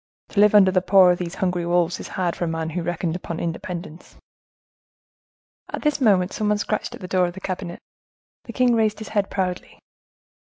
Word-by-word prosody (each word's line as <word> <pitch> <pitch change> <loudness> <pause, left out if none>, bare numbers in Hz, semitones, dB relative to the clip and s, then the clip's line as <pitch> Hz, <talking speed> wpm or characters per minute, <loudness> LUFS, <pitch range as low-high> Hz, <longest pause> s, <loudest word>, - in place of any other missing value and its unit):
To 200 - -2
live 210 0 +5
under 190 -2 +7
the 185 -1 +2
paw 185 -1 +6
of 175 - -1
these 175 0 -5
hungry 180 -3 -1
wolves 175 0 +1
is - - -7
hard 180 -2 -2
for 175 - -2
a - - -3
man 165 0 -3
who 175 +2 -3
reckoned 170 0 -2
upon 170 -2 -5
independence." 170 0 -6 1.5
At - - -6
this 300 -2 0
moment 195 -6 +3
someone 210 -1 0
scratched 215 +1 -3
at - - -14
the 180 - -6
door 180 -1 +2
of 175 - -6
the - - -7
cabinet; 185 -2 -5 0.7
the 235 - -8
king 250 0 +3
raised 220 -2 +1
his 215 - -8
head 205 -2 0
proudly. 180 -2 -3
185 Hz, 200 wpm, -23 LUFS, 175-205 Hz, 1.5 s, under